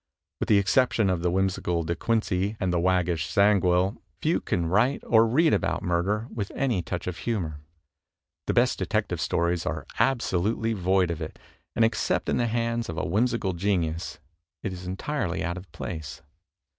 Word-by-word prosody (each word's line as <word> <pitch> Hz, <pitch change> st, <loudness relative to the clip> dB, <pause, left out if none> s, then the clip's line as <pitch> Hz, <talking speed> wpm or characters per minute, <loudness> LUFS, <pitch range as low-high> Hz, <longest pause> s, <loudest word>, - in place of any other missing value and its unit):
With -, -, -2 dB
the 105 Hz, -, +6 dB
exception 100 Hz, +1 st, +3 dB
of 90 Hz, -2 st, -1 dB
the 90 Hz, -, +1 dB
whimsical 90 Hz, -2 st, 0 dB
De 85 Hz, +2 st, -2 dB
Quincey 105 Hz, 0 st, 0 dB
and 95 Hz, -3 st, 0 dB
the 85 Hz, -, +2 dB
waggish 90 Hz, -2 st, +1 dB
Zangwill, 95 Hz, -2 st, +3 dB, 0.2 s
few -, -, +1 dB
can 85 Hz, -2 st, -1 dB
write 110 Hz, +11 st, +2 dB
or 115 Hz, 0 st, +5 dB
read 155 Hz, +7 st, +3 dB
about -, -, 0 dB
murder 95 Hz, +5 st, 0 dB
with 100 Hz, -4 st, -4 dB
any 125 Hz, -9 st, +1 dB
touch 90 Hz, +1 st, -4 dB
of 90 Hz, -1 st, -4 dB
humor. 85 Hz, -10 st, -3 dB, 0.9 s
The -, -, 0 dB
best -, -, +3 dB
Detective -, -, -1 dB
Stories 85 Hz, 0 st, 0 dB
are 80 Hz, -5 st, -3 dB
absolutely 115 Hz, -3 st, +1 dB
void 95 Hz, -2 st, +2 dB
of 85 Hz, 0 st, -5 dB
it, 80 Hz, -, -6 dB, 0.4 s
and 115 Hz, -, +4 dB
except 115 Hz, -, 0 dB
in -, -, +1 dB
the 120 Hz, -, +1 dB
hands 115 Hz, 0 st, -1 dB
of 80 Hz, -, -5 dB
a -, -, -1 dB
whimsical 110 Hz, +1 st, +1 dB
genius 85 Hz, -3 st, -1 dB, 0.5 s
it 100 Hz, -, -2 dB
is 90 Hz, 0 st, -8 dB
entirely 95 Hz, -, -2 dB
out 85 Hz, +2 st, -2 dB
of 90 Hz, +1 st, -10 dB
place. 80 Hz, -5 st, -6 dB
Mr. -, -, -31 dB
95 Hz, 175 wpm, -26 LUFS, 85-110 Hz, 0.9 s, the